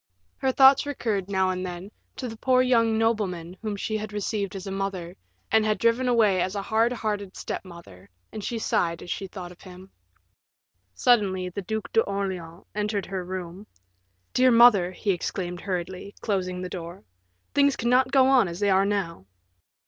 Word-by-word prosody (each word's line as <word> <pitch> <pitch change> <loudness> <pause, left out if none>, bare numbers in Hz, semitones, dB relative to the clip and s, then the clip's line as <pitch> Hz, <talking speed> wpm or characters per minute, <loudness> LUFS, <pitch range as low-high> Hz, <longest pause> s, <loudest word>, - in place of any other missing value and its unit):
Her 265 - +1
thoughts 270 +2 +6
recurred, 215 -9 -2
now 190 -1 +1
and 185 0 -3
then, 180 +2 -6 0.2
to 255 - -5
the 225 - -7
poor 255 +2 +3
young 230 -3 +3
nobleman 195 -7 -1
whom 215 -2 -3
she 215 +2 -2
had 215 0 -6
received 205 -1 -3
as 195 0 -6
a 195 - -5
mother, 190 -3 -4 0.4
and 220 0 +4
had 215 0 +1
driven 230 +2 +2
away 215 -6 +3
as 185 +3 -2
a 200 - -1
hard 225 +3 +2
hearted 210 -5 -3
step - - -5
mother, 170 - -14 0.2
and 215 - -7
she 235 - -3
sighed 170 -6 0
as 175 - -7
she 195 - -4
thought 180 -2 -8
of 180 - -16
him. 185 0 -13 1.0
Suddenly 190 - +2
the 190 +3 -5
Duc 220 +3 -5
d'Orleans 190 -5 -2
entered 210 -1 -2
her 190 -2 -4
room. 185 +2 -7 0.7
"Dear 255 0 +5
mother," 230 -7 +6
he 200 +2 -1
exclaimed 180 0 -3
hurriedly, 185 +1 -5
closing 185 -3 -2
the - - -3
door, 175 +1 -8 0.5
"things 280 -1 +4
cannot 250 +2 +2
go 270 -1 +5
on 260 -5 +4
as 170 +1 -6
they 205 -1 +2
are 190 +1 +4
now." 170 - -3
200 Hz, 180 wpm, -25 LUFS, 180-225 Hz, 1.0 s, thoughts